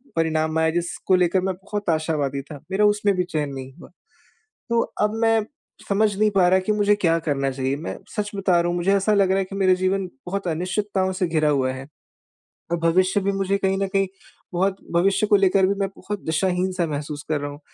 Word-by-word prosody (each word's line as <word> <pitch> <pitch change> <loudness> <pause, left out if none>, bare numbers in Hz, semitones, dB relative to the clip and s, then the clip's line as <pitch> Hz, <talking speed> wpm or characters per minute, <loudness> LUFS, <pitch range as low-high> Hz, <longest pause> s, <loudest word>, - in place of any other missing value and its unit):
परिणाम 160 -1 0
आया, 160 0 +3
जिसको 175 +3 0
लेकर 180 +1 +2
मैं 190 +1 -1
बहुत 200 +1 -5
आशावादी 155 -4 0
था, 145 +1 -10
मेरा 205 +2 +3
उसमें 205 -1 +2
भी 180 - +1
चयन 155 -5 -2
नहीं 135 0 -8
हुआ। - - -13 0.8
तो 235 0 +3 0.2
अब 210 +1 +1
मैं 225 -1 +3 0.4
समझ 205 0 +2
नहीं 215 0 +3
पा 190 -3 +3
रहा 185 +1 +4
कि 190 +3 0
मुझे 205 0 +3
क्या 165 -5 +2
करना 135 -1 0
चाहिए, 135 +1 -2
मैं 160 +3 -5 0.2
सच 210 -1 -1
बता 190 -3 +2
रहा 170 - 0
हूँ 175 - -1
मुझे 180 +3 +2
ऐसा 200 +2 +1
लग 195 -2 +3
रहा 190 - +3
है 195 - +1
कि 195 +1 -8
मेरा 190 -1 +4
जीवन 185 +1 0 0.2
बहुत 195 0 -3
अनिश्चितताओं 190 +3 -1
से 185 0 -1
घिरा 155 -2 +1
हुआ 130 -3 +1
है। 130 +1 -8 0.8
और 170 - +1
भविष्य 185 +4 +2
भी 200 +1 0
मुझे 195 0 0
कहीं 195 -1 0
न 195 0 0
कहीं 195 -1 +2 0.5
बहुत 190 +2 +1 0.2
भविष्य 195 +4 +2
को 205 - +5
लेकर 195 -1 +4
भी 195 - +2
मैं 195 - +1
बहुत 205 0 -5
दिशाहीन-सा 180 +2 0
महसूस 145 0 -5
कर 155 -2 +1
रहा 145 - -3
हूँ, 145 - -11
185 Hz, 215 wpm, -23 LUFS, 160-195 Hz, 0.8 s, को